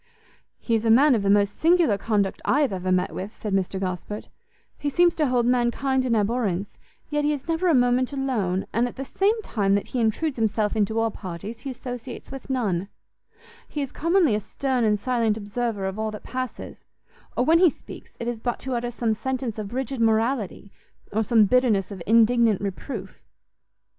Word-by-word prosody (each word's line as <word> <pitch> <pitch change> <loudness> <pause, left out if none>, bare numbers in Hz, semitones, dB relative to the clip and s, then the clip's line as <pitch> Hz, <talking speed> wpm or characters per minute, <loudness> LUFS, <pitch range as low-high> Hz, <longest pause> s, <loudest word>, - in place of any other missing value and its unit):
"He 235 - -3
is 225 -1 +2
a 225 - +1
man 270 +6 +6
of 225 - +2
the 200 - 0
most 200 0 +3
singular 335 - +4
conduct 200 -1 -1
I 290 - +2
have 275 -8 +1
ever 185 0 -2
met 180 0 +1
with," 195 +4 -6
said 210 -3 -3
Mr 190 0 0
Gosport; 190 +2 -4 0.5
"he 290 - -1
seems 345 +3 +4
to 305 -2 +1
hold 245 -2 +2
mankind 255 +2 +1
in 235 -2 +2
abhorrence, 205 -3 0 0.4
yet 295 0 +1
he 295 - +2
is 285 0 -6
never 330 +2 0
a 330 - +4
moment 245 +1 +2
alone, 230 -10 -1
and 235 +2 +2
at 245 - -9
the 270 - -5
same 410 - +1
time 200 - +1
that 200 - -2
he 255 - -2
intrudes 245 +6 0
himself 215 -1 +1
into 220 +1 0
all 225 0 +1
parties, 195 +4 -7
he 275 - -6
associates 245 -1 -7
with 270 0 -9
none: 200 -8 0 0.8
he 295 - -2
is 270 - -6
commonly 335 - +2
a 210 - +1
stern 255 +4 -1
and 210 -2 +2
silent 230 -2 +1
observer 210 -1 -3
of 190 +2 -3
all 220 0 -1
that 210 -1 -8
passes, 255 0 -6 0.5
or 245 - +2
when 330 +3 +5
he 360 -1 +7
speaks, - - -12
it 235 - -4
is 240 -2 -3
but 240 0 -1
to 265 - -4
utter 240 0 -1
some 235 -2 -1
sentence 250 -1 -3
of 205 -2 -5
rigid 260 0 -3
morality, 225 -3 0 0.4
or 220 +2 +2
some 220 -1 +4
bitterness 215 -5 +2
of 190 -3 -7
indignant 230 -1 +4
reproof." 200 +1 -6
230 Hz, 200 wpm, -24 LUFS, 205-260 Hz, 0.8 s, he